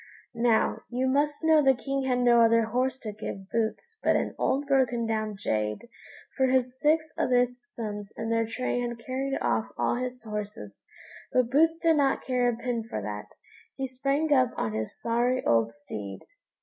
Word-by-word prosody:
Now, 230 -1 +2
you 250 +2 -1
must 290 +3 +1
know 320 -1 +5
the 270 -2 +4
King 275 +2 -2
had 255 -1 +1
no 240 -1 +5
other 230 0 +5
horse 255 +4 0
to 215 - -5
give 195 -2 -7
Boots 230 - -2
but - - +3
an - - 0
old 280 +2 +1
broken 255 -4 +2
down 215 -1 -1
jade, 105 - -2 0.5
for 265 -1 +3
his 255 0 +1
six 310 0 +2
other 250 -1 +3 0.2
sons 210 -4 -6
and 225 0 -3
their 230 0 +1
train 245 +1 -2
had 240 - -6
carried 265 +3 -3
off 220 - 0
all - - +1
his 250 -1 -4
horses; 210 - -7 0.4
but 250 -2 +2
Boots 320 +4 +4
did 330 -2 +3
not 275 -2 +2
care 250 -2 +1
a 240 - -1
pin 240 -1 -2
for - - -3
that, 105 0 -5 0.5
he 270 - -2
sprang 275 +4 0
up 255 -3 +4
on 110 - -1
his 110 0 -4
sorry 240 +2 0
old 115 -1 +3
steed. 105 -8 -8
245 Hz, 180 wpm, -27 LUFS, 220-265 Hz, 0.5 s, know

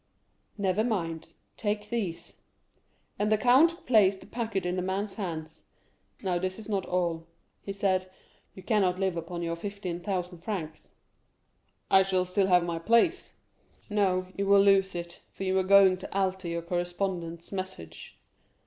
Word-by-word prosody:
"Never 200 +1 +1
mind—take 205 +2 -4
these;" 205 -8 -4 0.8
and 210 +1 +1
the 215 - +5
count 290 - +4
placed 200 -5 +4
the - - -12
packet 220 -6 -3
in 180 0 -1
the 185 - -1
man's 195 +2 -2
hands. 160 -6 -6 0.6
"Now 180 -2 0
this 185 +1 -3
is 220 - -9
not 200 -3 -1
all," 170 -2 -1 0.3
he 200 - -6
said; 190 -2 0 0.5
"you 190 - -11
cannot 190 -4 +2
live 190 -2 0
upon 170 +1 -5
your 170 0 -2
fifteen 185 -1 -5
thousand 180 -2 -3
francs." 165 -5 -5 1.0
"I 190 - +7
shall 190 -1 +1
still 190 +2 +1
have 180 -2 +5
my 170 -1 -3
place." 235 - +2 0.6
"No, 190 -3 +2
you 200 0 -1
will 200 0 +6
lose 195 -2 +4
it, 170 0 -6
for - - -8
you 190 0 0
are - - +1
going 195 -1 +6
to - - -9
alter 190 -1 0
your 170 0 -3
correspondent's 175 -1 -3
message." 185 - -7
190 Hz, 155 wpm, -28 LUFS, 175-200 Hz, 1.0 s, I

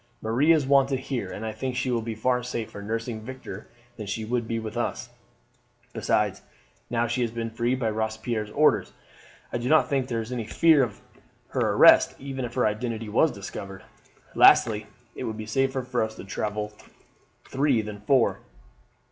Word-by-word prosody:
Marie 125 +9 +2
is 155 -4 +4
wanted 135 0 +3
here, 130 -7 -4
and 110 - -6
I 110 - -2
think 130 +3 -4
she 130 - -1
will 120 -1 0
be 110 0 -5
far 125 +3 +1
safer 115 -4 -5
nursing 115 +2 -4
Victor 120 -4 -8 0.3
than 105 -3 -6
she 110 +3 -3
would 120 0 -1
be 115 - -2
with 110 -1 -5
us; 120 0 -3 0.8
besides, 105 -3 0 0.5
now 120 0 +1
she 120 +2 -1
has 120 - +1
been 115 0 -4
freed 120 +3 0
by 115 -4 0
Robespierre's 110 0 -2
orders, 150 +7 +2 0.6
I 120 - 0
do 120 +2 -2
not 155 - +4
think 135 -2 0
there 115 -3 -2
is 115 +2 -6
any 120 -3 -3
fear 160 +3 +5
of 115 -6 -2 0.5
her - - 0
arrest - - +7
even 135 -1 -5
if 120 - -8
her 125 - +2
identity 110 +1 -2
were 115 +9 +4
discovered. 100 -5 -8 0.5
Lastly, 110 -2 +5 0.3
it - - -5
would 110 -1 -4
be 110 - -6
safer 130 +3 0
to 110 -4 -2
travel 105 +1 -3 0.7
three 135 -4 +1
than 105 -1 -8
four. 120 +3 +2
115 Hz, 175 wpm, -26 LUFS, 110-130 Hz, 0.8 s, arrest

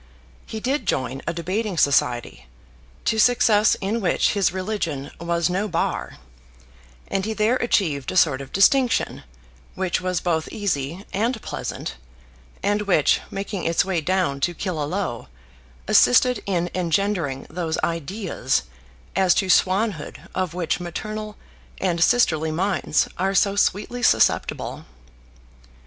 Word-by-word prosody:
He 220 - -5
did 270 +6 -1
join 130 +1 -1
a 170 - 0
debating 185 +4 -2
society, 120 - +1 0.6
to 220 - +1
success 220 -2 +4
in 215 +4 -1
which 180 - +2
his 200 -4 +2
religion 185 -7 -3
was 170 0 0
no 190 +4 -1
bar; 170 -4 -2 0.9
and 195 - -1
he 220 +2 -2
there 220 +4 +2
achieved 165 - 0
a 185 - -2
sort 145 -6 +4
of 135 - -10
distinction 245 +6 +3 0.5
which 185 -1 -1
was 185 -1 -1
both 160 -3 -1
easy 175 -2 -3
and 225 +4 0
pleasant, - - -5 0.7
and 205 +1 +1
which, 155 -7 +3
making 195 -2 -4
its 165 +1 +2
way 185 -4 0
down 175 -4 0
to 175 +5 0
Killaloe, 165 - -3 0.6
assisted 245 - +5
in 175 -3 0
engendering 175 -5 -1
those 160 -1 -3
ideas 170 -3 -1 0.5
as 190 -1 +4
to 190 - 0
swanhood 190 -3 +1
of 185 -3 -2
which 175 -3 -1
maternal 215 +5 -5 0.4
and 170 -3 +1
sisterly 160 -10 +3
minds 190 +5 +1
are 195 +1 0
so 200 0 +3
sweetly 210 +4 0
susceptible. - - +1
185 Hz, 130 wpm, -23 LUFS, 165-205 Hz, 0.9 s, assisted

